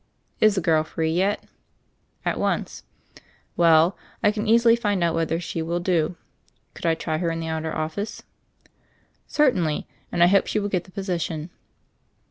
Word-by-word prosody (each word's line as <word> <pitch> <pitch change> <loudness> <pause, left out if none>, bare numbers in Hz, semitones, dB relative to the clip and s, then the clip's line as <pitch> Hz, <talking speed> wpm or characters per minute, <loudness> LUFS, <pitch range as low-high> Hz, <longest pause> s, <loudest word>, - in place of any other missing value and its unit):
"Is 215 -1 +5
the 190 - 0
girl 160 -1 +3
free 160 +1 -2
yet?" 190 +5 +1 0.8
"At - - 0
once." - - -1 0.7
"Well, 165 +1 +5 0.3
I 210 - +5
can 210 +1 -3
easily 230 +1 +5
find 205 -6 0
out 170 -1 +2
whether 165 0 0
she 170 -1 -4
will 170 +2 -1
do. 175 -1 0 0.6
Could - - -4
I 165 - +3
try 155 -1 -3
her 170 - 0
in 165 0 -3
the 165 - -4
outer 160 0 -3
office 160 +8 -4 0.6
?" - - -38 0.2
"Certainly, 185 - +1 0.3
and 175 - +3
I - - +9
hope 195 +2 +4
she - - -1
will 205 0 -2
get 180 -3 -1
the 185 - -17
posi 185 -3 -3
tion." 155 +2 -4
175 Hz, 175 wpm, -24 LUFS, 160-200 Hz, 0.8 s, I